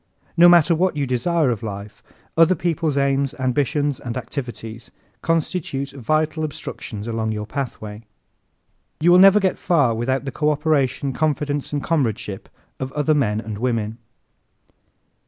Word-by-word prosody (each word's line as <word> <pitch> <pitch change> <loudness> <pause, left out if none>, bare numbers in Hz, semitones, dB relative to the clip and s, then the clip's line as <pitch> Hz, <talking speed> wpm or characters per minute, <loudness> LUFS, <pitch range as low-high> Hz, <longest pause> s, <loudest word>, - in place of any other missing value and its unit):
No 175 0 +8
matter 175 -1 +6
what 175 0 +1
you 140 - 0
desire 135 +3 +1
of 115 - -3
life, 100 -1 -7 0.3
other 165 +3 +5
people's 160 -3 -1
aims, 140 +1 +1
ambitions 140 +2 0
and 120 0 -5
activities 120 -2 -6 0.3
constitute 160 -4 -1
vital 155 +4 -1
obstructions 115 -7 -6
along 110 -1 -1
your 105 0 -4
pathway. 110 -4 -5 1.0
You 170 +3 +4
will 180 - +7
never 195 +2 +8
get 190 -2 0
far 145 -9 +2
without 130 +4 -1
the 135 - -3
co 150 +4 0
operation, 145 -3 0
confidence 145 0 -1
and 145 -1 -2
comradeship 115 -10 -2 0.3
of 130 0 -4
other 150 +1 +2
men 110 -7 +1
and 110 -2 -6
women. 115 -2 -1
140 Hz, 140 wpm, -21 LUFS, 115-155 Hz, 1.0 s, No